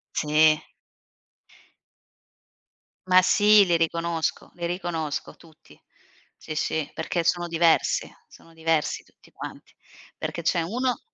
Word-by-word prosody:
Sì. 155 0 +3 2.4
Ma 185 0 +6
sì, 205 +1 +5
li 170 -1 +3
riconosco, 165 0 -2
li 175 -1 -7
riconosco 170 -4 -4
tutti. 160 -2 -20 0.6
Sì, 155 - -7
sì, 155 0 -2
perché 170 - -2
sono 175 +1 0
diversi, 165 0 +2 0.2
sono 165 - -19
diversi 160 -1 0
tutti - - -24
quanti. - - -10 0.4
Perché - - -5
c'è 170 - +1
uno 245 +8 -1
165 Hz, 110 wpm, -25 LUFS, 160-175 Hz, 2.4 s, Ma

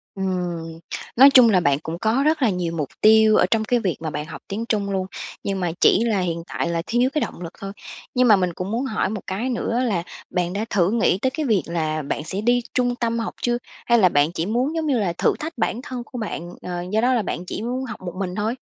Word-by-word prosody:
Ừm, 175 -4 -3 0.4
nói 270 +3 +9
chung 255 -4 +7
là 185 -3 +4
bạn 145 -5 +2
cũng 165 +2 -5
có 225 +6 +1
rất 310 -2 +2
là 235 - +4
nhiều 180 -3 -2
mục 150 -4 -2
tiêu 220 0 +6
ở - - +4
trong 220 -1 +2
cái 240 +2 +1
việc 185 -6 -1
mà 160 -1 -3
bạn 150 0 -4
học - - -9
tiếng 210 +4 -3
Trung 200 -2 0
luôn, 190 -1 -1 0.4
nhưng 195 -1 -2
mà 175 -2 0
chỉ 225 - +5
là 220 -4 +1
hiện 170 -2 -2
tại - - -2
là 170 -1 -1
thiếu 245 +3 +2
cái 305 - 0
động - - -4
lực 170 - -6
thôi. 195 0 -5 0.4
Nhưng 250 0 +4
mà 210 - +8
mình 180 -2 0
cũng 180 +3 -5
muốn 235 +4 -1
hỏi 220 -7 -1
một 210 0 -4
cái 210 +7 -2
nữa 235 -1 -1
là 200 -8 0 0.3
bạn 180 -1 -1
đã 205 +3 -2
thử 185 -2 +2
nghĩ 225 -4 +2
tới 260 +5 0
cái 295 +2 -3
việc 210 -8 +2
là 155 -2 -1
bạn 145 +1 -3
sẽ 190 +4 -3
đi 240 +2 +2
trung 245 -1 +1
tâm 235 -1 -1
học 225 - -3
chưa? 240 0 +1 0.3
Hay 235 0 +5
là 185 - +6
bạn 145 0 +2
chỉ 165 -1 -2
muốn 250 +9 0
giống 320 -1 -1
như 265 -5 +2
là 185 -5 0
thử - - +3
thách 315 -2 -6
bản 230 +1 0
thân 255 -3 -5
của 245 - -8
bạn, 175 -6 -4
ờ, 175 -1 -4
do 220 - +3
đó 250 +2 +3
là 235 - +2
bạn 180 -2 -4
chỉ 210 - -5
muốn 250 +3 -2
học 245 - -7
một 180 -2 -6
mình 185 -2 -3
thôi? 215 +4 -1
210 Hz, 270 wpm, -22 LUFS, 175-240 Hz, 0.4 s, nói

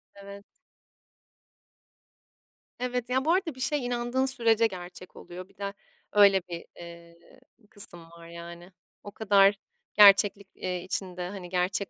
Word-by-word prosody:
Evet. 200 0 -12 2.3
Evet, 250 -1 -3
ya, 260 +2 0
bu 325 - +3
arada 350 -6 -1
bir 260 - -14
şey 285 0 -1
inandığın 245 +2 -1
sürece 230 -4 +2
gerçek 185 -1 -11
oluyor. 180 +1 -10
Bir - - -27
de 200 0 -5 0.4
öyle 200 -2 +6
bir, 170 -1 -7
eee, 170 0 -13 0.5
kısım 175 -5 -3
var, 170 0 -14
yani. 170 +1 -11 0.3
O 205 - -9
kadar 200 -1 +4 0.4
gerçeklik, 200 -1 +6
eee, 180 -1 -4
içinde, 180 -1 -4
hani, 190 -3 -8
gerçek 185 +2 -1
200 Hz, 130 wpm, -27 LUFS, 180-230 Hz, 2.3 s, öyle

